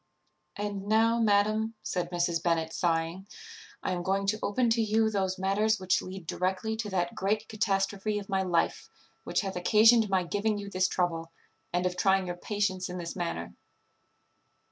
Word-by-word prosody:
"And 205 -1 -4
now, 225 +2 +3
madam," 215 +1 +2
said 180 -2 -2
Mrs. 170 -2 0
Bennet, 165 -2 0
sighing, 170 +2 -1 0.6
"I - - -1
am 180 -1 -1
going 195 +2 0
to 215 +2 0
open 235 +3 +1
to 230 0 +3
you 220 0 +2
those 190 -2 -1
matters 205 +3 +1
which 185 -1 +1
lead 185 -1 -8
directly 190 +6 -1
to 220 -2 -3
that 175 -3 -1
great 210 +3 -1
catastrophe 205 -1 0
of 200 -1 -5
my 195 -1 0
life 175 -3 0 0.4
which - - 0
hath 195 -2 -4
occasioned 220 +4 +5
my 190 -1 +2
giving 205 +4 -1
you 200 -1 -7
this 185 -1 +2
trouble, 165 -3 -1 0.4
and 180 +1 0
of 180 0 0
trying 190 0 +3
your 175 -1 -4
patience 190 -2 -1
in 180 - -5
this 170 -1 -5
manner." 170 - -4
195 Hz, 170 wpm, -29 LUFS, 180-210 Hz, 0.6 s, occasioned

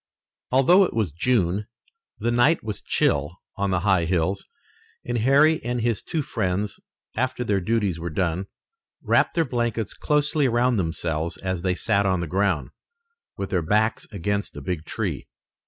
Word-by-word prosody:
Although 155 +10 +5
it - - -5
was 105 -8 0
June, 100 - +1 0.5
the 120 - -1
night 120 +8 +3
was 105 -2 -5
chill 75 +5 0 0.2
on 100 0 -1
the 95 -2 +1
high 95 -3 +3
hills, 90 +3 -1 0.6
and 120 -1 -1
Harry 145 +7 +4
and 120 +1 -2
his 115 -2 0
two 160 -3 -2
friends, 100 -3 -2 0.4
after 125 +1 -1
their 100 -4 0
duties 100 -3 0
were 85 +1 -4
done, 90 +3 -1 0.6
wrapped - - +2
their 165 -1 +2
blankets 120 -4 -2
closely 150 -1 +1
around 120 0 +2
themselves 80 -2 -2
as 95 -2 -3
they 90 0 0
sat 100 +2 +1
on 95 -1 +1
the 85 - -2
ground, 90 -5 0 0.7
with 100 - -4
their 90 - +1
backs 105 +7 +1
against 100 +1 -2
a - - -6
big 90 -4 -4
tree. - - -3
100 Hz, 160 wpm, -24 LUFS, 90-120 Hz, 0.7 s, Although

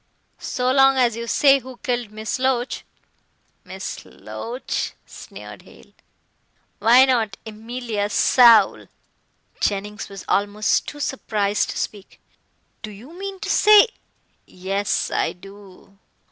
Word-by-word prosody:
"So 250 0 -1
long 270 0 +4
as 240 -3 +2
you 235 0 -6
say 275 +2 +4
who 260 -1 -12
killed 240 -3 -2
Miss 215 +3 -5
Loach 255 -1 -1 0.4
" - - -44
"Miss - - -7
Loach," 245 +3 -6
sneered - - -12
Hale, - - -19 0.9
"why 245 +4 +6
not 225 -7 0
Emilia 220 -1 -4
Saul?" 235 0 +5 0.7
Jennings 210 +1 -3
was 195 -1 -10
almost 205 +1 0
too 295 - -8
surprised 210 -7 -1
to - - -5
speak. 200 -2 -6 0.6
"Do 215 - -7
you 220 +10 -13
mean 390 +1 -7
to - - -5
say 425 +2 +6 0.4
" - - -43
"Yes, 195 +2 -2
I - - -1
do. 195 +1 -16
230 Hz, 125 wpm, -21 LUFS, 205-260 Hz, 0.9 s, why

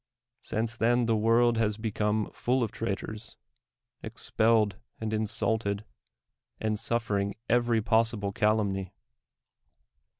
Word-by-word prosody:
Since 115 +2 -2
then 120 +1 +3
the 115 -1 +2
world 115 +2 +3
has 105 -2 +1
become 110 -1 -1
full 125 +1 0
of 110 - -2
traitors, 110 +1 -5 0.6
expelled 110 -3 +1 0.2
and 110 -1 -3
insulted, 110 -1 0 0.7
and 110 -1 -1
suf 115 0 -1
fering 100 -1 0
every 120 -2 +2
possible 110 -3 +1
cabumny. 100 -3 +1
110 Hz, 105 wpm, -29 LUFS, 105-115 Hz, 0.7 s, then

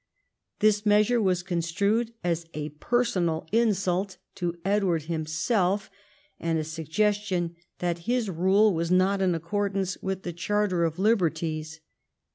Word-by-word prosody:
This 210 -1 +4
measure 210 +3 +4
was 180 -3 +1
con 175 -2 -1
strued 200 +7 0
as 170 -1 -1
a 150 0 -3
personal 170 - 0
insult 195 -4 +1 0.2
to 175 -1 -3
Edward 195 -5 +1
himself, 170 +5 0 0.5
and 165 -1 0
a 155 - -1
suggestion 175 +3 -1 0.2
that 175 -1 -1
his 245 -2 +1
rule 190 +4 +3
was 165 0 -1
not 190 +2 +3
in 185 -2 +2
accordance 190 +2 -2
with 190 -1 -3
the 175 - -4
Charter 185 -1 0
of 165 0 -2
Liberties. 160 -6 0
185 Hz, 130 wpm, -27 LUFS, 165-205 Hz, 0.5 s, This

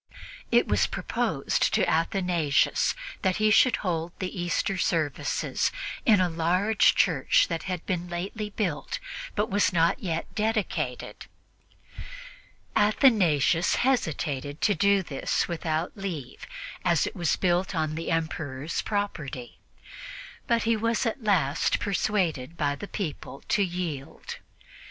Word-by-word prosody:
It - - +4
was - - +2
proposed - - -1
to - - +2
Athanasius 165 -3 +1 0.3
that 190 -1 +1
he 215 0 +3
should 250 +4 +5
hold 170 -1 -1
the 185 -1 -4
Easter 175 +3 0
services 160 -5 0 0.4
in 215 -4 +6
a 185 - +3
large 180 +6 +2
church 155 -8 +3
that 165 -2 -2
had 180 -2 -4
been 180 -2 -2
lately 195 +5 -4
built 185 -8 -2 0.4
but 210 0 0
was 205 +1 +3
not 165 -1 +2
yet 165 -4 -3
dedicated. 215 -1 -2 1.5
Athanasius 195 - +3
hesitated 150 - -1
to 210 - +3
do 200 +2 +3
this 140 -5 -1
without 165 -1 -2
leave, 170 -10 -6 0.4
as 170 -3 +3
it - - -5
was 170 -5 +1
built 180 0 0
on 155 -1 0
the 165 +1 -4
Emperor's 160 -3 -2
property, 160 - -4 0.9
but 235 -1 +2
he 230 0 +2
was 230 +3 0
at 230 +2 -2
last 165 -9 +2
persuaded 175 -8 -1
by 145 -2 +1
the 145 +8 -7
people 155 -8 -5
to 205 - +3
yield. 175 -7 -4
175 Hz, 125 wpm, -27 LUFS, 160-205 Hz, 1.5 s, in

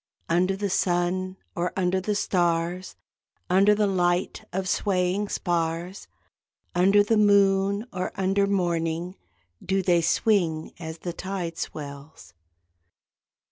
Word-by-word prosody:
Under 180 +3 +2
the 200 +1 -2
sun 185 +1 0 0.2
or 175 0 -1
under 185 0 +1
the 210 +2 -1
stars 175 -1 0 0.6
(Under 200 +3 +5
the 210 0 +2
light 180 -2 0
of 185 +1 -2
swaying 190 +1 0
spars), 170 +1 -2 0.7
Under 195 +3 +4
the 220 +2 +1
moon 200 0 +3
or 185 0 -3
under 195 +1 +1
morning 175 -2 -1 0.5
Do 195 0 0
they 175 -2 +3
swing, 165 -4 +1
as 160 -1 -6
the 175 +1 -5
tide 180 -2 -5
swells. 140 - -8
185 Hz, 115 wpm, -25 LUFS, 170-195 Hz, 0.7 s, Under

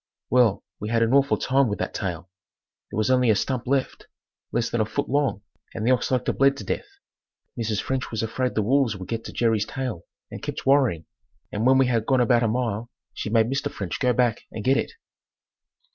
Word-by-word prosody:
Well 120 -5 +3 0.2
we 105 - -4
had 115 0 +2
an 115 +2 +1
awful 140 0 +4
time 135 0 +2
with 105 - -2
that - - -3
tail. 90 -4 -4 0.6
There - - -6
was 110 +4 +2
only 125 -2 +3
a 110 - +5
stump 125 +3 -2
left, 135 0 -1 0.4
less 120 - 0
than 120 - -1
a - - +2
foot 125 +7 -3
long, 140 -6 0 0.3
and 110 - -3
the 125 - +4
ox 125 - +1
like 125 -1 0
to - - +1
bled 140 0 +3
to - - -6
death. - - -3 0.7
Mrs. 110 -3 -2
French 130 -1 -2
was 110 -1 -3
afraid 125 +3 -2
the 110 - +2
wolves 125 -2 +2
would 95 -1 -8
get 115 -1 -3
Jerry's 110 -3 0
tail 125 -11 -4 0.3
and - - -7
kept - - -5
worrying, 130 - +3 0.5
and 110 +4 0
when 130 0 +6
we 135 - +5
had 115 -3 0
gone 130 -2 +3
about 120 -1 +4
a 115 - +2
mile 115 -1 -2 0.2
she - - -4
made 110 0 +4
Mr. 135 - -1
French 95 -4 -5
go 125 - +3
back 120 -2 +1
and 110 - -6
get 130 +2 +3
it. - - -1
120 Hz, 220 wpm, -24 LUFS, 110-130 Hz, 0.7 s, when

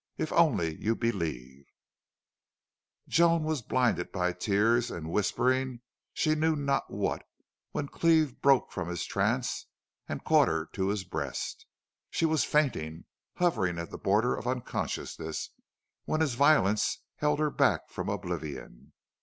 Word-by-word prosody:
If 155 - -2
only 110 - +2
you 115 +2 +1
believe 75 - -3 0.7
" - - -57
Joan 170 -1 +4
was 155 -3 -1
blinded 120 -6 0
by 90 -2 0
tears 110 +6 +2
and 80 -1 -6
whispering 130 +5 +1 0.3
she 155 - +1
knew 155 +1 +2
not 140 -2 -1
what - - -2 0.5
when 145 - -3
Cleve 160 -4 +2
broke 135 -2 +4
from 90 -3 -4
his 85 -2 -3
trance - - -1 0.4
and - - -4
caught - - +5
her 80 -1 -1
to 95 -1 -1
his 100 -1 -1
breast. 75 -7 -4 0.4
She - - 0
was 160 -2 +2
fainting 85 - 0 0.3
hovering 110 - +1
at 85 0 -5
the - - -7
border 105 +5 +2
of 120 - -6
unconsciousness 115 -9 -3 0.5
when 155 - 0
his 150 -6 +1
violence 120 -6 +3
held 150 0 +1
her 150 0 +1
back - - +2
from - - -4
oblivion. 70 -5 -5
115 Hz, 140 wpm, -29 LUFS, -, 0.7 s, caught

